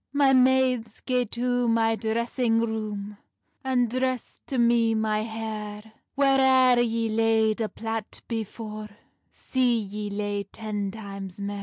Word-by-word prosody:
"My 280 -1 +4
maides, 255 -3 +3
gae 250 -1 0
to 245 +2 0
my 225 -1 +3
dressing 225 +2 0
roome, 210 -2 -3 0.5
And 255 -2 +2
dress 255 +1 -2
to 265 - -3
me 235 -1 +3
my 215 -1 0
hair; 220 -1 -6 0.2
Whaireir 265 -2 +5
yee 230 -1 0
laid 220 0 +2
a 215 - -1
plait 225 -1 -5
before, 215 -1 -5 0.4
See 250 -2 +1
yee 210 0 -5
lay 205 0 -2
ten 210 -1 -4
times 195 -3 -8
mair. 200 0 -4
225 Hz, 130 wpm, -26 LUFS, 215-245 Hz, 0.5 s, Whaireir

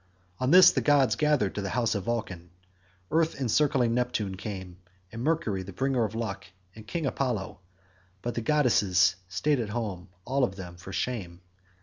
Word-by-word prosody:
On 130 - 0
this 180 +2 +9
the - - 0
gods 135 -7 +3
gathered 145 -6 +1
to 105 - -3
the 100 - -3
house 115 -1 0
of 100 -3 -3
Vulcan. 95 -7 -3 0.6
Earth 160 -2 +1
encircling 130 -1 +2
Neptune 120 -5 -1
came, 95 -2 -7 0.3
and 115 +1 -6
Mercury 140 - 0
the 95 +1 -9
bringer 130 +3 0
of 110 +1 -6
luck, 100 -4 -4 0.3
and 110 -1 -12
King 165 -3 -3
Apollo, 125 -10 -2 0.6
but 120 - -2
the 115 - -3
goddesses 100 - +3
staid 140 +9 0
at 110 -3 -3
home 100 -5 -4 0.2
all 135 +2 0
of 95 -6 0
them 90 -3 -8
for 90 +2 -10
shame. 95 -8 -4
115 Hz, 175 wpm, -28 LUFS, 95-130 Hz, 0.6 s, this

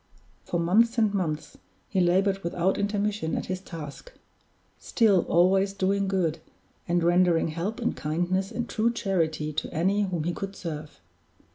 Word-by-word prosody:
For 175 - -1
months 225 +8 +3
and 215 -3 +3
months 160 -6 -3 0.3
he 190 - 0
labored 190 +3 +2
without 175 +3 0
intermission 205 -4 -1
at - - -3
his 185 0 -3
task; 165 - -9 0.7
still, 210 -6 +2
always 190 +3 +3
doing 195 0 0
good, 175 -4 0 0.5
and 175 0 +1
rendering 175 -1 +3
help 175 +9 -3
and 240 - -1
kindness 175 +6 -1
and 240 +1 -3
true 230 +1 +1
charity 160 -9 -1
to 155 - -3
any 190 +5 +1
whom 180 -6 -1
he 175 +2 -1
could 195 +3 -5
serve. 155 -4 -7
185 Hz, 150 wpm, -26 LUFS, 170-200 Hz, 0.7 s, months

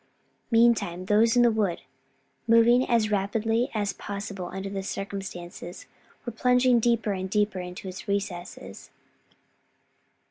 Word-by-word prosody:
Meantime 220 -6 +2
those 220 +4 +3
in 240 - +6
the 240 - +5
wood, 205 -6 -1 0.7
moving 235 +2 +5
as 225 -3 +2
rapidly 225 +4 0
as 205 -2 -1
possible 200 -2 -6
under 190 +1 -5
the 195 0 -4
circumstances, 190 -3 -7 0.4
were 240 - -3
plunging 250 +1 +3
deeper 230 -2 +1
and 190 0 -4
deeper 210 -1 0
into 180 +1 -7
its 185 +3 -8
recesses. 195 -3 -5
205 Hz, 120 wpm, -26 LUFS, 190-230 Hz, 0.7 s, in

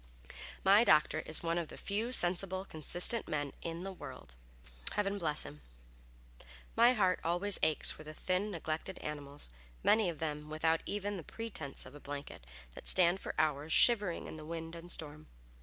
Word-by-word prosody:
My 200 +3 +6
doctor 155 -5 +4
is 155 - 0
one 165 +1 0
of 170 - -4
the - - -11
few 215 +4 -3
sensible, 185 -2 +3
consistent 175 +7 -2
men 145 -2 -3
in 165 +1 -5
the 195 - -5
world; 60 - -10 0.6
heaven 205 -1 -1
bless 155 -4 -1
him! 75 +1 -11 1.1
My 240 +2 +6
heart 185 -6 +2
always 180 +4 +3
aches 155 - +4
for 155 - -10
the 155 0 -10
thin, 185 +5 -1
neglected 165 0 -4
animals, 145 -1 -6 0.4
many 215 -4 +4
of 165 - -5
them 150 -1 -4
without 160 +1 +1
even 205 0 -3
the 170 - -7
pretense 200 -9 -6
of - - -12
a 145 - -11
blanket, 140 - -8 0.3
that - - -9
stand 180 0 +7
for - - -6
hours 150 +1 +1
shivering 205 -8 +5
in - - -8
the 155 - -9
wind 165 +1 -6
and 170 +1 -7
storm. 155 -2 -2
170 Hz, 175 wpm, -33 LUFS, 155-195 Hz, 1.1 s, stand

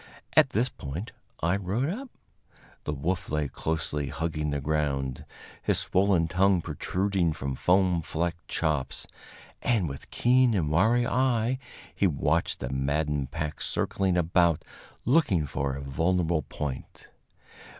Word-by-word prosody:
At - - +6
this 115 +5 +1
point 85 - -6 0.3
I 85 +3 +2
rode 100 +8 -1
up. 255 +7 -6 0.8
The - - -1
wolf 85 +6 -2
lay 75 -1 0
closely 75 -1 -2
hugging 75 0 -2
the 70 0 -1
ground, 70 -3 -1 0.4
his - - +1
swollen 95 -3 +2
tongue 95 +2 +3
protruding 95 0 0
from 70 -3 -3
foam 90 +3 +3
flecked 85 +1 -3
chops, 75 -5 -1 0.6
and 110 -8 +2
with 70 -2 -8
keen 125 -1 +3
and 80 -6 0
wary 115 +9 +4
eye 125 -1 +1 0.3
he 100 - +2
watched 80 +1 0
the - - -3
maddened 70 +1 0
pack 75 0 -4
circling 95 -2 0
about 85 -1 +2 0.4
looking 115 - +3
for 70 -1 -2
a 70 - -5
vulnerable 80 +4 +1
point. 70 -1 -6
85 Hz, 130 wpm, -28 LUFS, 75-95 Hz, 0.8 s, At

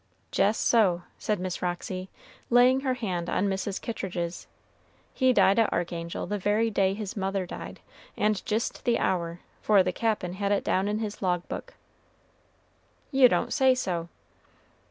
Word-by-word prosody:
"Jes' 210 +3 +3
so," 185 -7 +3 0.2
said 210 -3 -1
Miss 185 -1 -4
Roxy, 185 +1 -3 0.4
laying 250 +2 +5
her 265 -2 -1
hand 185 -8 -3
on 200 - +1
Mrs. 195 0 -2
Kittridge's; 175 -6 -4 0.7
"he 260 -1 +3
died 215 -3 +4
at 225 - +3
Archangel 170 -1 -3
the 205 0 -3
very 215 +4 +1
day 195 -1 +2
his 205 -2 -5
mother 195 -1 -1
died, - - -8 0.4
and 210 -1 +1
jist 220 +2 -2
the 235 -1 +2
hour, 170 -2 -1 0.2
for 205 -3 +5
the - - 0
Cap'n 215 -6 -1
had 200 +1 -1
it 200 - +1
down 190 +2 +1
in 210 +1 0
his 215 -2 -5
log 180 -2 0
book." - - -7 1.4
"You 265 -3 +6
don't - - 0
say 265 -3 +4
so!" 175 -8 -2
200 Hz, 155 wpm, -27 LUFS, 180-225 Hz, 1.4 s, You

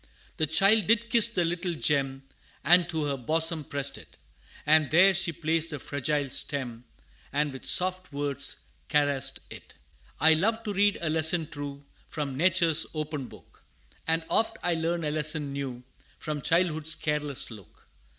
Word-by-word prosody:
The 155 - +1
child 195 +6 +4
did 230 +1 +2
kiss 230 -2 +5
the 185 -7 -1
little 175 +1 -2
gem, 135 -3 0 0.4
And 175 0 +5
to 160 -3 -1
her 140 -1 -1
bosom 160 +5 +1
pressed 140 0 -2
it; - - -17 0.5
And 155 -1 +4
there 185 +5 +6
she 185 -1 0
placed 165 0 -1
the 150 - -4
fragile 145 +1 -2
stem, 125 -3 -2 0.5
And 145 0 -1
with 135 - -7
soft 185 -1 -1
words 140 -1 -2 0.3
caressed 145 -3 0
it. - - -12 0.4
I 160 +1 +6
love 220 +8 0
to 210 - -3
read 205 +1 +2
a 165 - -1
lesson 160 +1 +2
true, 145 -1 -7 0.2
From 145 -4 -4
nature's 170 0 +3
open 150 -3 -4
book - - -17 0.5
And 165 0 +1
oft 225 - +1
I 175 - +1
learn 165 +1 -1
a 150 - -1
lesson 150 -2 -1
new, 130 -3 -5 0.3
From 150 -1 -4
childhood's 160 -1 +1
careless 150 -4 -2
look. 100 -6 -15
155 Hz, 160 wpm, -27 LUFS, 145-175 Hz, 0.5 s, there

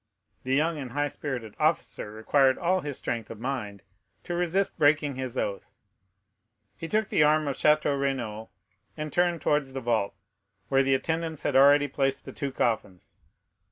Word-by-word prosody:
The 130 +1 0
young 155 +2 +1
and 130 -4 -7
high 145 +1 0
spirited 125 -7 -5
officer - - 0
required 130 +5 +2
all 185 +1 +1
his 145 -5 -5
strength 115 -2 -4
of 115 - -8
mind 110 -6 -4 0.4
to 175 - -5
resist 180 +2 0
breaking 145 -1 +3
his 130 -1 -5
oath. 100 - -4 1.0
He 165 - -6
took 215 +3 0
the - - +2
arm 150 0 +4
of 140 - -1
Château 150 -1 +2
Renaud, 115 -6 -3 0.5
and 150 -1 -5
turned 175 -2 +1
towards 150 -3 +1
the 135 - -3
vault, 115 -4 0 0.5
where 135 0 +4
the 135 0 +3
attendants 160 +2 -3
had - - -1
already 145 +2 +6
placed 135 0 -1
the - - -8
two 140 -1 -3
coffins. 110 -8 -2
140 Hz, 165 wpm, -27 LUFS, 125-155 Hz, 1.0 s, already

